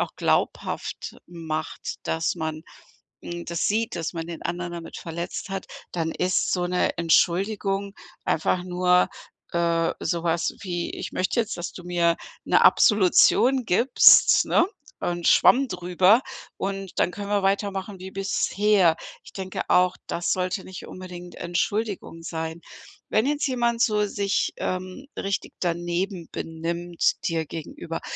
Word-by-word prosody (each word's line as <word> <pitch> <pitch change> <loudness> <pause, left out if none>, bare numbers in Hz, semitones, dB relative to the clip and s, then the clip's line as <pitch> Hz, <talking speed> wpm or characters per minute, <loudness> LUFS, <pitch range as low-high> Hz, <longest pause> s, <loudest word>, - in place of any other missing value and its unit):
auch - - -1
glaubhaft - - -1
macht, 160 -2 -5
dass 160 +2 0
man, 160 -1 -4 0.6
hm, 175 0 -6
das 170 -1 -1
sieht, 220 +2 0
dass 165 +1 -3
man 165 -1 -4
den 170 -2 -7
anderen 175 0 -3
damit 170 -1 -7
verletzt 170 +3 -5
hat, 195 -1 -4 0.3
dann 165 -2 -1
ist 185 +1 0
so 180 -1 +1
'ne 180 0 0
Entschuldigung 195 +4 +1 0.3
einfach 180 +3 +1
nur, 180 0 +3 0.4
äh, 170 -1 +1
sowas 170 0 0
wie: 175 -3 -3
„Ich - - -6
möchte 185 +6 0
jetzt, 220 -5 -1
dass 175 - -4
du 180 - -10
mir 170 -1 +2 0.3
'ne - - +4
Absolution 235 +5 +5
gibst, 240 +8 +6
ne, 350 - +3 0.3
und 175 -1 -2
Schwamm 270 +1 +6
drüber 180 +4 +3 0.4
und 195 -1 -4
dann 180 - +2
können 205 +1 -6
wir 205 -1 +1
weitermachen 195 0 -1
wie 190 +1 -8
bisher.“ 195 -2 +2 0.3
Ich - - -14
denke 190 -1 -4
auch, 180 0 +4
das 170 - -1
sollte 185 +1 -2
nicht 185 - -9
unbedingt 180 -1 -9
Entschuldigung 185 0 -2
sein. 160 0 -5 0.5
Wenn 215 - +2
jetzt 290 -1 0
jemand 235 -2 0
so 210 -1 +3
sich, 200 0 0
ähm, 185 +8 -4
richtig 195 0 -3
daneben 175 +1 -2
benimmt 170 +1 -1
dir 165 -1 -1
gegenüber, 165 - -6
180 Hz, 140 wpm, -25 LUFS, 170-200 Hz, 0.6 s, gibst